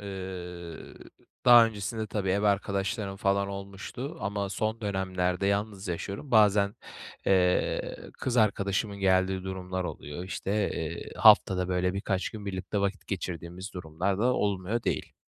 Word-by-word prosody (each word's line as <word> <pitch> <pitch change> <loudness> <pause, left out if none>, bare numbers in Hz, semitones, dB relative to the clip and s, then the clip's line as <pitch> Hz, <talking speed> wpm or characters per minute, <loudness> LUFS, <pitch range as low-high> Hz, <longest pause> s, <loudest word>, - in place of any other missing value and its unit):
Iıı, 90 -4 -7 0.5
daha 120 -2 +9
öncesinde 110 +1 -4
tabii, 100 -3 -1
ev 100 +2 +1
arkadaşlarım 100 0 0
falan 100 0 +1
olmuştu 100 +8 -6
ama 100 -1 -2
son 110 +3 -2
dönemlerde 95 -2 -1
yalnız 100 0 -1
yaşıyorum. 100 - -4
Bazen, 105 -2 +5 0.5
eee, 90 -2 +2 0.2
kız 125 -1 -1
arkadaşımın 100 -1 +1
geldiği 95 0 +2
durumlar 95 -1 -4
oluyor. 80 +1 -6
İşte, 95 - -4 0.2
eee, 80 +1 -5
haftada 90 -1 +6
böyle 90 0 +1
birkaç 95 -1 -1
gün 105 -2 -8
birlikte 95 +1 -3
vakit 100 +1 -2
geçirdiğimiz 90 0 -5
durumlar 90 +3 -2
da 115 - +1
olmuyor 100 +3 0
değil. - - -2
100 Hz, 130 wpm, -28 LUFS, 95-105 Hz, 0.5 s, daha